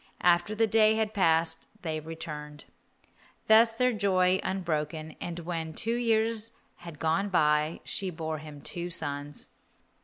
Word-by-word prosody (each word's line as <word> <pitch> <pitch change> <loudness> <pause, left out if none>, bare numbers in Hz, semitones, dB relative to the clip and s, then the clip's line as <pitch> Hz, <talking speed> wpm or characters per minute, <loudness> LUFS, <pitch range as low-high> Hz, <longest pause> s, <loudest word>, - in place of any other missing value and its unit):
After 175 +4 +3
the 225 +1 +3
day 220 0 +4
had 220 -1 -1
passed 165 -4 +2 0.2
they 160 -2 -2
returned. 150 -2 -8 0.8
Thus 225 +1 +7
was - - -18
their 250 0 +3
joy 190 -3 +2
unbroken, 155 -4 -3
and 175 -1 -4
when 165 -2 -4
two 230 - 0
years 225 -1 +1 0.2
had 170 -3 -10
gone 160 +7 0
by 150 -2 +2
she 195 - -3
bore 160 -2 -4
him 150 -1 -10
two 175 +3 -4
sons. 145 -3 -4
170 Hz, 145 wpm, -29 LUFS, 155-215 Hz, 0.8 s, Thus